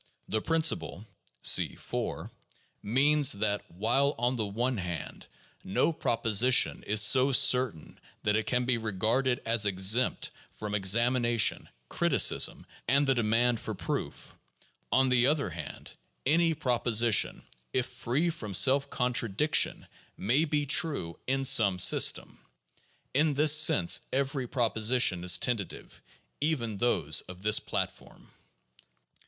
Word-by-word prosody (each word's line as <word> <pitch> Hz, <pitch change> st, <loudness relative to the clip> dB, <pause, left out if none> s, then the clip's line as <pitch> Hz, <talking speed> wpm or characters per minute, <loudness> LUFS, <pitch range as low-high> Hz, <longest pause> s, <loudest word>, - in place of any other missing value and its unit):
The 110 Hz, -, -2 dB
principle 160 Hz, -, -2 dB, 0.4 s
(see -, -, +2 dB
4) -, -, -6 dB, 0.5 s
means, 140 Hz, +5 st, +2 dB
that, 100 Hz, 0 st, -2 dB
while 120 Hz, -, 0 dB
on 120 Hz, +2 st, -1 dB
the 110 Hz, -4 st, -3 dB
one 120 Hz, +5 st, -3 dB
hand 90 Hz, -5 st, -7 dB, 0.4 s
no 100 Hz, -, 0 dB
proposition 115 Hz, -2 st, +1 dB
is 105 Hz, 0 st, +3 dB
so 130 Hz, +5 st, +4 dB
certain 125 Hz, -9 st, +1 dB, 0.2 s
that 105 Hz, -, 0 dB
it 110 Hz, -, -2 dB
can 125 Hz, -1 st, -1 dB
be 125 Hz, -2 st, 0 dB
regarded 115 Hz, +5 st, -1 dB
as 115 Hz, -2 st, +2 dB
exempt 100 Hz, +6 st, 0 dB, 0.2 s
from 105 Hz, -1 st, -7 dB
ex 100 Hz, 0 st, +3 dB
amination, 120 Hz, -2 st, +1 dB, 0.2 s
criticism, -, -, +1 dB, 0.2 s
and 140 Hz, +4 st, +2 dB
the 135 Hz, -, +2 dB
demand 120 Hz, 0 st, 0 dB
for 110 Hz, -, -6 dB
proof, 80 Hz, -3 st, -6 dB, 0.6 s
on 130 Hz, 0 st, +2 dB
the 125 Hz, 0 st, +3 dB
other 145 Hz, 0 st, 0 dB
hand, 75 Hz, -3 st, -9 dB, 0.3 s
any 165 Hz, +3 st, +1 dB
proposition, 120 Hz, -5 st, 0 dB, 0.3 s
if 125 Hz, -, -1 dB
free 135 Hz, +7 st, -2 dB
from 105 Hz, -, -6 dB
self 140 Hz, +5 st, +3 dB
contradiction, 125 Hz, +2 st, 0 dB, 0.3 s
may 130 Hz, +11 st, +1 dB
be 150 Hz, -1 st, -2 dB
true 140 Hz, -, 0 dB
(in 135 Hz, +1 st, -1 dB
some 110 Hz, -8 st, +4 dB
system). 90 Hz, -, +2 dB, 0.7 s
In 145 Hz, +2 st, +1 dB
this 150 Hz, +1 st, +4 dB
sense 150 Hz, -, +4 dB
every 135 Hz, -1 st, -2 dB
proposition 115 Hz, -5 st, +1 dB
is 90 Hz, -1 st, +4 dB
tentative, 110 Hz, -2 st, -4 dB, 0.4 s
even 130 Hz, -9 st, -2 dB
those 85 Hz, -10 st, +1 dB
of 90 Hz, +1 st, -11 dB
this 105 Hz, 0 st, +3 dB
platform. -, -, -7 dB
120 Hz, 125 wpm, -28 LUFS, 105-135 Hz, 0.7 s, so